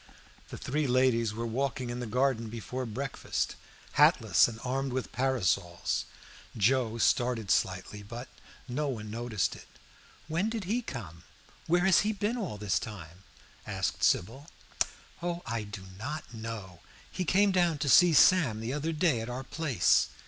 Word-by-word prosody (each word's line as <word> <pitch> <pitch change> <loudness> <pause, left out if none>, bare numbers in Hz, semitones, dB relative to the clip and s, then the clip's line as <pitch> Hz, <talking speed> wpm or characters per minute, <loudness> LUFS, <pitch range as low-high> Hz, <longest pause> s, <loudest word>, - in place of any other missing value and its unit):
The - - -7
three 150 +2 -1
ladies 125 -3 +3
were 115 +2 -4
walking 125 +1 -2
in 120 - -4
the 120 - -4
garden 120 -1 0
after 120 +3 -4
breakfast, 135 +5 -3 0.4
hatless - - +5
and 115 -1 -7
armed 135 +1 -1
with 130 -2 -3
parasols. 110 -9 0 0.5
Joe 115 +1 +2
started 120 -4 +1
slightly, 95 +2 0
but 120 +5 -8 0.4
no 145 +4 -1
one 110 -6 -4
noticed 115 -3 -1
it. - - -13 0.6
"When 170 +7 0
did 225 -2 -3
he 220 +7 0
come 95 - -7 0.5
where 175 +2 +3
has 190 - +6
he 215 +2 +1
been 210 +3 -1
all 195 - -4
this 105 -1 0
time?" 90 -4 -9 0.5
asked - - -2
Sybil. 130 +11 +1 0.7
"Oh, 175 0 -3
I 115 -3 -2
do 105 -2 -8 0.2
not 145 +2 -5
know. 110 -6 -7 0.3
He 185 - -2
came 195 +4 +3
down 175 -4 +2
to 145 +1 -2
see 170 +5 +7
Sam 150 -14 +5
the 115 +3 -3
other 155 +3 -2
day 155 -7 +2
at 115 - -5
our 125 +2 -4
place. 135 - +2
125 Hz, 155 wpm, -30 LUFS, 110-150 Hz, 0.7 s, see